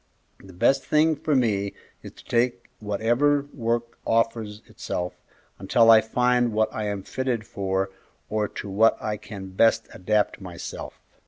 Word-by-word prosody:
The 95 - -13
best 110 +9 +2
thing 155 +1 +3
for 150 +1 -1
me 100 -6 +1 0.3
is - - -10
to - - -17
take 120 0 0
whatever 120 +8 +1
work 115 -1 -2
offers 115 -2 0
itself, 90 0 -4 0.5
until 115 +4 +5
I 110 -1 +8
find 125 +1 +1
what 110 0 +1
I 110 - -3
am 100 -2 -3
fitted 125 -1 -2
for 95 -3 -2 0.4
or 105 -1 -1
to 100 - -7
what 105 +4 +3
I 105 -1 -3
can 100 -2 -9
best 115 +3 +3
adapt 105 +2 0
myself." 90 -3 -8
110 Hz, 150 wpm, -25 LUFS, 100-120 Hz, 0.5 s, I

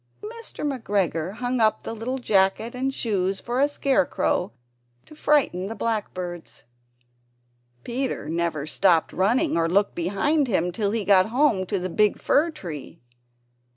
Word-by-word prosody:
Mr. 460 -5 -7
McGregor 195 - -1
hung 245 +1 -2
up 220 -1 +2
the - - -5
little 235 +4 -3
jacket 210 -1 +1
and 255 +1 -2
the - - 0
shoes 195 -4 -1
for 240 +1 -3
a 285 +2 +3
scarecrow 275 -9 0 0.5
to - - -15
frighten 285 -12 +1
the 225 - -5
blackbirds. 185 -7 -4 1.2
Peter 255 - -3
never 165 -2 -2
stopped 165 +1 +2
running 245 - +2
or 165 0 +1
looked 200 +3 +2
behind 205 - +1
him 180 -5 0
till 200 +2 -1
he 215 -1 -2
got 190 -1 +5
home 230 -6 +2
to 200 - -1
the 185 0 -3
big 210 +3 +2
fir 310 +4 +2
tree. 170 - -8
210 Hz, 150 wpm, -24 LUFS, 185-260 Hz, 1.2 s, got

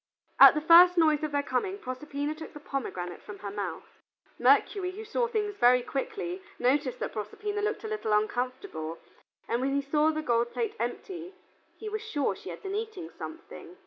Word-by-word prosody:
At - - +10
the 300 - 0
first 350 +3 +8
noise 310 -2 +4
of 305 -1 -2
their 285 0 0
coming, 375 +10 -1
Proserpina 285 0 -4
took 315 +1 -10
the - - -7
pomegranate 185 -12 -5
from 210 - -9
her 200 -1 -6
mouth. 205 0 -6 0.4
Mercury, 385 -3 +3
who 420 +4 -8
saw 470 +2 0
things 425 -3 -1
very 250 +1 +5
quickly, 360 - -4 0.2
noticed 260 0 +1
that - - -3
Proserpina 410 - -4
looked 425 +2 -2
a - - -4
little 430 - -3
uncomfortable, 215 - -1 0.5
and 235 - 0
when 275 +1 0
he 280 - +2
saw 300 +2 +2
the 310 0 -2
gold 235 -2 +1
plate 450 -2 -2
empty, 365 -1 -5 0.4
he 440 - -7
was 430 0 -3
sure 340 -11 -1
she - - -10
had - - -8
been 390 0 -4
eating 420 -5 -5
something. 335 +2 -9
310 Hz, 185 wpm, -29 LUFS, 255-400 Hz, 0.5 s, At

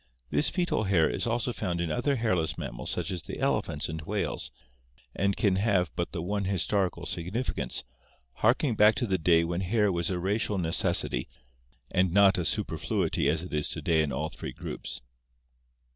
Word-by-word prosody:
This 150 - +4
fcetat 175 - 0
hair 85 -5 +4
is - - -1
also 120 +1 0
found 85 -5 -2
in 85 -2 -1
other 140 - +1
hairless 95 -10 0
mammals - - -5
such - - -1
as 90 -3 -3
the - - -7
elephants - - 0
and 80 0 -5
whales, 75 - -3 0.7
and 100 0 +1
can 95 -3 +2
have 95 -6 +2
but 85 - -2
the 85 -3 -4
one 100 +2 -1
histori 95 0 +1
cal 85 - -10
significance, 90 +10 -2 0.5
harking 120 +3 +3
back 105 0 +6
to 120 - 0
the 95 -4 0
day 85 +1 +4
when 85 +2 -2
hair 105 +2 +2
was 85 -2 -1
a 90 - -1
racial 100 +3 0
necessity 80 -7 0 0.6
and 90 -1 +2
not 100 0 +5
a 85 - -1
superfluity - - 0
as 80 +2 +1
it 90 - -8
is 75 0 0
to - - -3
day 80 -2 +3
in 75 -2 -1
all 75 +4 -2
three 70 - -7
groups. - - -5
90 Hz, 185 wpm, -28 LUFS, 85-105 Hz, 0.7 s, back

